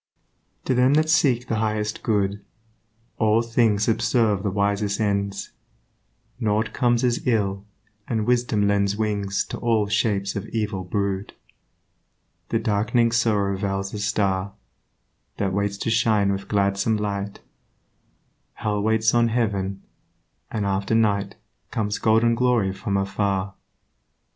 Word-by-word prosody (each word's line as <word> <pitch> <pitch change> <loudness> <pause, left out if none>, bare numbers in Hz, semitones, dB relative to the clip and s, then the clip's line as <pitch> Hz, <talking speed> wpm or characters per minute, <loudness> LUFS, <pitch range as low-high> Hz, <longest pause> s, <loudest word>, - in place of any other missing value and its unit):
To - - +1
them 130 +3 +4
that 155 +1 +2
seek 130 -6 +3
the 115 - -1
highest 105 -1 -1
good 100 -2 0 0.8
All 110 +1 +3
things 115 -3 +2
subserve 110 -2 +2
the 100 - -1
wisest 100 +1 0
ends; 100 -2 -1 0.9
Nought 110 -1 0
comes 120 -1 +2
as 120 0 0
ill, 100 -4 0 0.4
and 110 -3 -1
wisdom 120 -4 +1
lends 100 0 +1
Wings 100 -2 -1
to - - -5
all 115 -3 +2
shapes 100 -2 0
of 100 +1 -4
evil 105 -4 -2
brood. 100 +1 -2 1.2
The 115 - +1
dark'ning 115 +2 +1
sorrow 105 -5 +1
veils 95 0 -3
a 105 - -4
Star 100 -2 0 0.8
That 95 -2 -1
waits 100 0 -1
to 115 - -2
shine 110 -3 +2
with 100 0 -4
gladsome 100 +2 +1
light; 100 -1 -4 1.1
Hell 105 -1 -2
waits 110 +1 +2
on 120 -1 +4
heaven; 100 -5 -1 0.7
and 105 -2 -2
after 100 +2 0
night 100 -3 +1 0.3
Comes 105 -4 -2
golden 115 +1 +3
glory 115 -5 +1
from 100 +1 -2
afar. 100 0 -1
105 Hz, 130 wpm, -23 LUFS, 100-115 Hz, 1.2 s, them